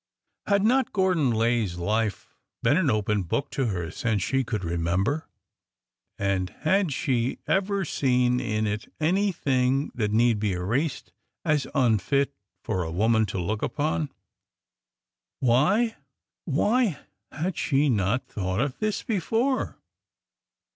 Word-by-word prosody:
Had 200 -1 +3
not 250 +2 +2
Gordon 185 -8 +2
Lay's 115 -5 +1
life 105 +4 -1 0.3
been 145 - +4
an 165 -4 +2
open 105 -2 +1
book 90 +10 -2
to 135 -3 0
her 85 -6 -3
since 110 -7 -1
she 135 +6 +1
could 110 -5 -3
remember? 90 - -1 0.9
And 95 -2 0
had 190 -4 +2
she 130 -3 0
ever 195 0 +1
seen 125 -4 +2
in 110 -2 -1
it 105 +1 -3
any 190 +6 +2
thing 135 -3 +1
that 110 -4 -1
need 115 0 +3
be 105 -2 0
erased 115 - -2 0.3
as 150 -3 +1
unfit 135 - +2 0.3
for 95 - -1
a 80 - -3
woman 110 +5 +2
to 95 - -4
look 105 +5 -2
upon?... 150 -1 -1 1.3
Why, 170 - +3 0.3
— - - -16
zvhy 225 - +2 0.3
had 170 +5 -3
she 145 0 +2
not 110 0 +1
thought 95 -1 -3
of 135 0 -1
this 215 -1 -1
be 215 -4 0
fore 240 +9 0
125 Hz, 135 wpm, -26 LUFS, 105-160 Hz, 1.3 s, been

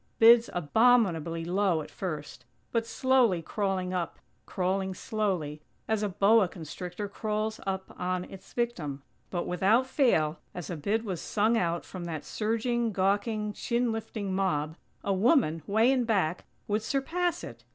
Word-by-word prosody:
Bids 230 +1 +7
abominably 175 -3 +3
low 180 -3 +1
at - - -13
first, 150 -8 -5 0.3
but 230 -1 0
slowly 240 -8 +3
crawling 190 -1 -1
up; 175 -2 -2 0.3
crawling 190 +1 -1
slowly, 180 -9 -2 0.3
as 220 -1 +1
a 210 - 0
boa 205 +2 +4
constrictor 180 +4 -6
crawls 215 +1 -2
up 190 0 -3
on 180 0 -1
its 190 +1 -12
victim. 160 - -2 0.3
But, 175 -2 -2
without 205 +8 +3
fail, 175 - +2 0.2
as 180 0 -5
a - - -2
bid 210 +9 -1
was 185 -5 -3
sung 220 +2 +1
out 170 -5 0
from 180 -2 -7
that 160 -3 -5
surging, 230 +2 0
gawking, 205 +2 0
chin 235 +1 0
lifting 215 -3 -4
mob, 160 -5 0 0.3
a 200 - +1
woman, 195 - +3
way 220 +5 +4
in 260 -2 +2
back, 185 -7 0 0.2
would 210 +1 0
surpass 330 +9 -1
it! - - -9
195 Hz, 150 wpm, -29 LUFS, 175-225 Hz, 0.3 s, Bids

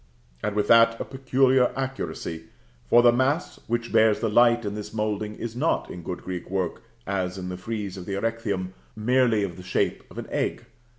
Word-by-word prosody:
And 105 - -2
with 105 - +1
that 115 0 +6
a - - -3
peculiar 130 -1 +2
accuracy; 130 -11 -4 0.4
for 120 - +6
the 120 - +7
mass 130 +7 0
which 120 0 -2
bears 110 -1 +4
the 115 -3 -1
light 120 +1 +4
in 100 - -2
this 105 +1 -7
moulding 105 -1 -2
is 115 -1 -6
not 150 +7 0
in 90 - -7
good 90 +1 -6
Greek 90 -1 -5
work, 95 -2 -2 0.2
as 95 -1 -2
in 90 -1 -5
the 90 - -4
frieze 100 -1 -5
of 90 - -8
the 100 - -2
Erechtheum, 100 -4 -2 0.2
merely 115 -1 +2
of 90 -4 -4
the - - -8
shape 95 - 0
of - - -14
an - - -4
egg. - - -2
110 Hz, 195 wpm, -25 LUFS, 95-120 Hz, 0.4 s, the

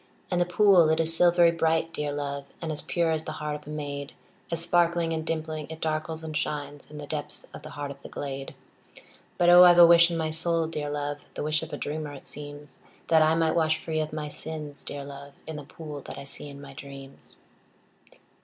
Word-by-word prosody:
And 180 -1 +2
the 175 - +2
pool, 180 -3 +5
it 160 - +2
is 165 0 +2
silvery 175 0 +5
bright, 165 0 +1
dear 150 -2 -2
love, 140 -1 -3
And 165 -2 -3
as 150 - -1
pure 170 -2 0
as 160 0 -1
the 155 - -4
heart 150 -1 -3
of 150 0 -10
a - - -7
maid, 145 -2 -5 0.4
As 165 - -2
sparkling 170 -1 +2
and 160 -1 -2
dimpling, 155 -1 -3
it 160 0 -7
darkles 155 0 -2
and 155 -1 -5
shines 145 -1 -3
In 150 - -10
the 150 - -6
depths 150 0 -4
of - - -9
the - - -9
heart 145 -1 -4
of 140 0 -11
the - - -10
glade. 135 -1 -5 0.8
But, 175 - +4
oh, 175 +1 +10
I 175 -1 +8
've - - -1
a 175 - +11
wish 170 0 +7
in 170 - -2
my 160 -1 -1
soul, 165 +1 +1
dear 150 -2 -3
love, 145 0 -3 0.2
(The - - -3
wish 155 +1 +1
of 160 0 -7
a - - -4
dreamer, 150 0 -4
it 140 - -11
seems,) 145 0 -9 0.3
That 160 -1 +6
I 155 +1 +4
might 165 -1 +2
wash 155 -2 +2
free 160 0 -3
of 155 0 -2
my 155 -1 -4
sins, 150 -1 -6
dear 140 -1 -5
love, 140 0 -10
In 160 - -6
the 150 - -7
pool 150 0 -8
that - - -6
I 140 - -6
see 140 +1 -8
in 140 0 -10
my 140 -1 -10
dreams. 135 -1 -11
155 Hz, 235 wpm, -27 LUFS, 145-165 Hz, 0.8 s, a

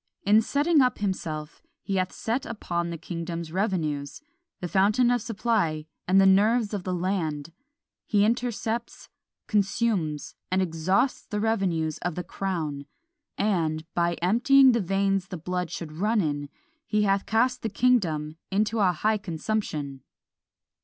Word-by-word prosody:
In 210 +2 +6
setting 290 +6 +3
up 250 -1 +2
himself 165 -6 -4 0.2
he 195 - -1
hath 185 0 0
set 235 +4 -2
upon 170 -5 -3
the 170 - -4
kingdom's 170 0 -5
revenues, 160 -7 -2 0.4
the 180 - -3
fountain 210 +7 +3
of 245 -1 +1
supply, 200 -9 0 0.2
and 190 +2 +5
the 195 - +6
nerves 210 +3 +4
of 200 -3 -3
the 185 - -3
land. 170 -4 -2 0.5
He 205 -2 +3
intercepts, 235 0 -2 0.4
consumes, 195 -7 0 0.2
and 185 +1 +1
exhausts 185 - 0
the 210 - -3
revenues 185 -8 0
of 175 -2 -3
the 180 - -3
crown; 155 -8 -4 0.5
and, 165 -6 0
by 170 0 +1
emptying 255 +7 +6
the 235 -2 +1
veins 195 0 0
the 185 - -6
blood 180 +1 -3
should 165 -3 -6
run 210 +8 +1
in, 145 -5 -1 0.4
he 210 -1 +2
hath 195 -1 +1
cast 250 +3 +2
the 225 - -2
kingdom 175 -10 +1
into 215 +3 0
a 185 -3 +4
high 215 +6 +1
consumption." 160 -6 -3
190 Hz, 145 wpm, -26 LUFS, 165-220 Hz, 0.5 s, In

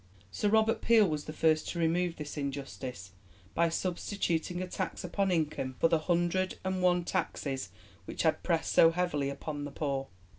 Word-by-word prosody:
Sir 205 - 0
Robert 220 +1 +3
Peel 225 -3 +5
was 150 -3 -2
the - - -5
first 155 0 +2
to - - -4
remove 170 +1 +1
this 150 -1 -7
injustice, 135 - -5 0.4
by 170 0 +3
substituting 175 0 -1
a 185 - -2
tax - - -4
upon 195 +2 0
income 155 -6 -1
for 165 - +4
the 165 - +3
hundred 175 +3 0
and 190 -1 -1
one 180 -1 +3
taxes 145 -7 -2 0.4
which - - -3
had - - +2
pressed 90 - 0
so 165 +11 +7
heavily 165 -5 0
upon 145 +1 -5
the 145 - -4
poor. 140 -2 -2
165 Hz, 175 wpm, -31 LUFS, 145-180 Hz, 0.4 s, so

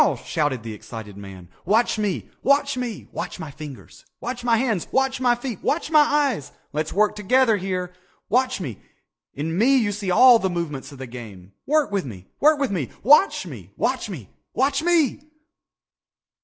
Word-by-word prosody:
shouted 145 -7 -1
the 115 -1 -6
excited 105 -1 -9
man. 95 -3 -10 0.2
"Watch 220 +4 +2
me! 205 -4 -2
Watch 280 0 +2
me! 245 -4 -5
Watch - - -5
my 160 -4 -6
fingers! 145 -2 -11 0.2
Watch 245 0 -5
my 235 -2 +3
hands! 220 -7 0
Watch 265 -1 +1
my 245 -1 +4
feet! 240 -4 -6
Watch 315 +1 -1
my 310 - +7
eyes! 285 - +2 0.2
Let's 155 +1 -2
work 210 +1 +2
together 225 +3 +3
here! 180 -1 -3 0.3
Watch 255 +1 +1
me! 130 - -6 0.6
In 160 +4 -3
me 255 +8 +4
you 220 -5 +1
see 200 -1 -4
all 240 +6 +7
the 190 - 0
movements 165 -6 -4
of 140 - -11
the 130 - -6
game! 110 -7 -10 0.2
Work 300 -4 +2
with 200 -2 0
me! 95 -8 -9
Work 305 +1 +5
with 275 -5 0
me! 160 - -2
Watch 295 - +5
me! - - -10
Watch - - -1
me! - - -7 0.3
Watch 275 +1 +2
me!" 330 -5 +2
205 Hz, 175 wpm, -23 LUFS, -, 0.6 s, my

